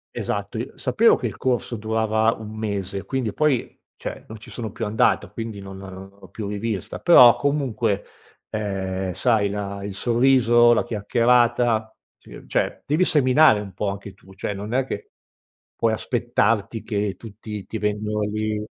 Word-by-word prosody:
Esatto - - -3
i - - -4
sapevo - - +3
che - - -3
il - - -8
corso 125 -2 -1
durava 110 0 +1
1 110 -1 -9
mese 100 -2 -3
quindi 120 -1 -2
poi 150 -3 0 0.2
cioè - - -7
non 110 0 -9
ci - - -13
sono 115 -4 -6
più 115 - -4
andato 105 +1 +1
quindi 115 -3 -6
non 95 -1 -9
non 95 0 -10
l'ho - - -14
più 105 -3 -6
rivista, 105 -1 -4
però 125 -9 +8
comunque, 125 -8 -1 0.5
ehm, 95 -3 -3
sai 105 +1 +2
la 100 -1 -5
il 100 0 -5
sorriso, 120 0 +4
la 115 - +2
chiacchierata 120 0 +2 0.2
ci - - -14
cioè - - -1
devi 155 +5 +2
seminare 140 -5 +5
un 100 -2 -8
po' 100 +3 -3
anche 100 0 -7
tu, 95 0 -18
cioè 95 +2 -4
non 105 +3 -6
è 130 +1 +1
che 105 - -6 0.6
puoi 115 -1 +1
aspettarti 115 -2 0
che 105 -2 -2
tutti 105 -2 -8
ti 110 - -5
vengono 105 0 -1
lì, 105 0 -2
110 Hz, 165 wpm, -23 LUFS, 100-120 Hz, 0.6 s, però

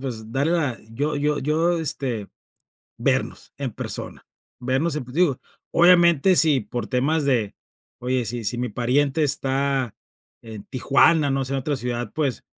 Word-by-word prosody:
pues, 115 -4 -7
darle 140 +6 0
la 145 -8 -1
yo 145 +6 -2
yo 150 +1 0
yo, 165 +5 0
este, 125 -9 -2 0.7
vernos, - - -1
en - - -4
persona, - - -5 0.3
vernos 135 +6 0
en 140 - -4
pues 125 - -13
digo, 160 -6 +2 0.3
obviamente, 175 0 +5
si 150 -5 +7
por 115 +1 -5
temas 140 +4 0
de 120 -7 0 0.4
oye, 125 0 -1
si 115 +1 -4
si 120 +4 -2
mi 125 0 -2
pariente 135 +7 0
está 135 -3 0 0.5
en 110 -3 -10
Tijuana, 140 +3 +2
no 135 0 -1
sé, 135 +1 -3
en 135 - -1
otra 145 +2 -2
ciudad, 120 -2 -3
pues, 145 -5 -2
135 Hz, 155 wpm, -22 LUFS, 125-150 Hz, 0.7 s, si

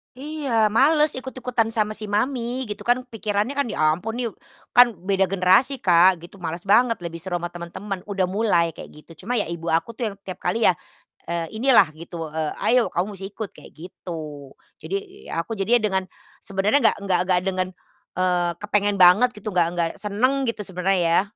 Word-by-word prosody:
Iya, 270 -6 0
males, 295 +7 +3
ikut-ikutan 250 -3 -2
sama 215 -1 0
si 215 - -6
mami 240 +4 -1
gitu 210 0 -6
kan, 245 +2 +2
pikirannya 215 +3 -2
kan, 280 - +2
ya 155 0 +2
ampun 225 +7 -5 0.6
kan 245 -1 +8 0.2
beda 195 -1 +3
generasi 195 +8 +3
Kak, 180 -1 +5
gitu 175 +4 -13
males 175 0 -6
banget, 230 +3 +4
lebih 170 -1 -6
seru 175 +1 -3
sama 175 - -3
teman-teman, 180 +3 -7
udah 195 -3 -1
mulai 185 -5 +1
kayak - - -10
gitu. 160 +3 -15
Cuma 240 +2 0
ya - - -2
ibu 170 0 -4
aku 165 +8 0
tuh 225 -3 -2
yang - - -12
tiap 190 -2 -7
kali 220 +6 +2
ya, 180 - +4 0.6
eee, 170 +4 -3
inilah 245 -8 +5
gitu, 165 0 -7
eee, 155 0 -3
"Ayo 250 +2 +3
kamu 175 +2 0
musti 195 +1 -7
ikut," 210 0 -7
kayak - - -14
gitu. 155 -4 -9 0.3
Jadi - - -3 0.4
ya 165 - -2
aku 225 - -6
jadinya 215 +5 +2
dengan 190 -2 0 0.4
sebenarnya 200 +8 +1
nggak 220 - +4 0.3
nggak 180 -1 +3
dengan, 185 -1 0 0.5
eee, 180 -1 +1
kepengen 205 -1 +1
banget 185 +8 +7
gitu, 210 - -10
nggak 170 -2 +4
nggak 170 -1 +1
senang 255 +7 0
gitu 230 -2 -2
sebenarnya 185 +1 0
ya, 170 - +5
195 Hz, 185 wpm, -23 LUFS, 175-230 Hz, 0.6 s, kan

